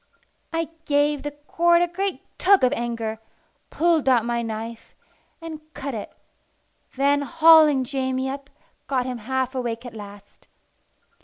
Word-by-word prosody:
I 330 -1 -2 0.2
gave 290 -1 +2
the 290 - -3
cord 340 +4 +2
a - - +1
great 380 +3 -3 0.2
tug 390 -2 +5
of 255 +2 +4
anger, 230 -3 -3 0.5
pulled 325 -4 +2
out 240 -3 +4
my 235 0 -1
knife, 225 0 -6 0.4
and 325 -2 -8
cut 275 0 -5
it; 215 - -6 0.8
then, 280 +2 +2
hauling 315 -2 +6
Jamie 260 0 -2
up, 275 +1 -6 0.4
got 255 -3 0
him 250 -2 -4
half 260 +3 -2
awake 240 -2 -3
at 245 - -8
last. 205 -2 -12
270 Hz, 140 wpm, -23 LUFS, 235-310 Hz, 0.8 s, hauling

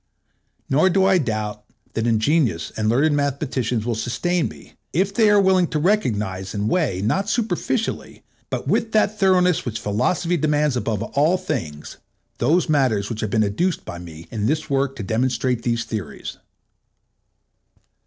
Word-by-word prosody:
Nor 155 +7 +3
do 190 +1 +3
I 190 -1 +4
doubt 105 -5 -3 0.3
that 115 +1 -1
ingenious 115 - +1
and 110 0 0
learned 145 +6 +3
mathematicians 130 -5 -1
will 120 - 0
sustain 125 +11 -1
me, - - -13 0.2
if 190 +3 +1
they 220 0 +4
are 210 0 +5
willing 190 -2 +4
to 155 - -2
recognize 105 - 0
and 105 +1 -1
weigh, 125 - 0
not 195 - 0
superficially, 235 +1 -2 0.3
but - - -4
with 225 - 0
that 215 0 +2
thoroughness 180 -3 +3
which 115 -3 -4
Philosophy 165 - 0
demands 150 -2 +1
above 115 -3 -1
all 150 +9 +2
things, 110 - -5 0.4
those 160 +10 +2
matters 130 -10 +1
which 115 - -4
have 110 - -1
been 110 +1 +2
adduced 155 - -1
by 85 - -7
me 85 -1 -10
in 110 -2 -1
this 155 0 -1
work 135 0 +1
to 115 - -5
demonstrate 125 +3 0
these 115 -1 0
theories. 105 -8 -6
135 Hz, 155 wpm, -22 LUFS, 110-180 Hz, 0.4 s, are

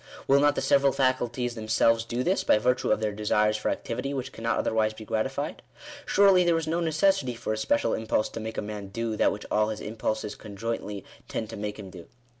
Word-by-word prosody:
Will 140 +1 +5
not 145 0 +4
the - - -1
several 140 0 +4
faculties 125 -2 0
them 110 -2 -7
selves 115 +1 +3
do 120 +2 -2
this, 185 +6 +1
by - - +4
virtue 125 +3 +1
of - - +2
their 105 -1 0
desires 105 +1 +1
for 105 - -1
activity, 125 +4 -3
which 130 -1 -4
can 115 - -11
not 115 - +1
otherwise 110 -1 +1
be 110 - -10
gratified? 135 +7 -2 0.5
Surely 195 -2 +5
there 170 -1 +3
is 165 - -2
no 165 +2 0
necessity 160 -5 +1
for 115 -1 -3
a - - -3
special 290 - +1
impulse 110 -1 0
to - - -7
make 110 0 -6
a - - -1
man 105 -1 -6
do 115 +2 -3
that - - +3
which 105 - -6
all 105 0 +2
his 110 - -4
impulses 110 -1 -3
conjointly 105 -1 -5 0.2
tend 110 0 -4
to - - -6
make 105 0 -4
him 100 -3 -9
do. 90 -2 -11
115 Hz, 225 wpm, -27 LUFS, 110-135 Hz, 0.5 s, Will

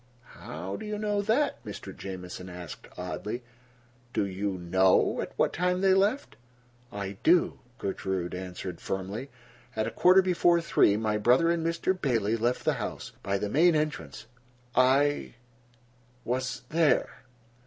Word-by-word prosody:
"How 90 +5 -6
do - - -7
you 210 0 -3
know 205 -1 0
that?" 240 +8 +1
Mr. 100 -2 -8
Jamieson 90 -1 -7
asked 90 -2 -9
oddly. 105 +6 -4 0.7
"Do - - +1
you 100 +1 -2
know 95 +2 +3
at - - -5
what - - +2
time 180 +1 0
they 190 -1 +5
left?" 200 +8 +1 0.5
"I 100 -1 -5
do," 175 +1 +3 0.2
Gertrude 95 -4 -3
answered 90 -1 -6
firmly. 100 +8 -4 0.5
"At 110 0 0
a - - -3
quarter 185 +1 +5
before 175 -1 +3
three 105 -10 +3
my 105 -1 0
brother 125 +10 +4
and 170 -1 0
Mr. 165 +3 +1
Bailey 115 - 0
left 120 +2 -1
the - - +3
house, - - -5
by 100 0 -1
the 105 - -2
main 160 +9 +4
entrance. 150 0 -3 0.5
I—was—there." 135 +1 +3
115 Hz, 135 wpm, -28 LUFS, -, 0.7 s, they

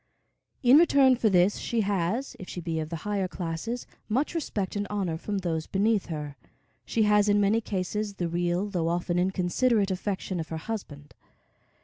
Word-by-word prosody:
In 255 +4 +8
return 275 -6 +5
for 230 -2 +2
this, 185 +1 +3
she 230 -1 0
has, 200 +6 -1
if 185 - -9
she - - -5
be 165 -1 -2
of 155 -1 -4
the 170 - -4
higher 200 -2 0
classes, 180 +8 -4 0.2
much 260 +10 0
respect 210 - -3
and 205 0 -2
honor 195 -5 -1
from 200 +5 -3
those 165 -4 -2
beneath 205 +1 +1
her. 150 -4 -5 0.5
She 225 - +1
has, 210 0 +4
in 205 0 +4
many 205 +3 +3
cases 205 +1 -3
the 175 -3 -2
real 175 +3 0
though 175 -5 -1
often 175 +1 0
inconsiderate 190 +4 +1
affection 190 -1 -3
of 160 - -5
her 160 - -3
husband. 160 -7 -7
195 Hz, 175 wpm, -27 LUFS, 175-215 Hz, 0.5 s, In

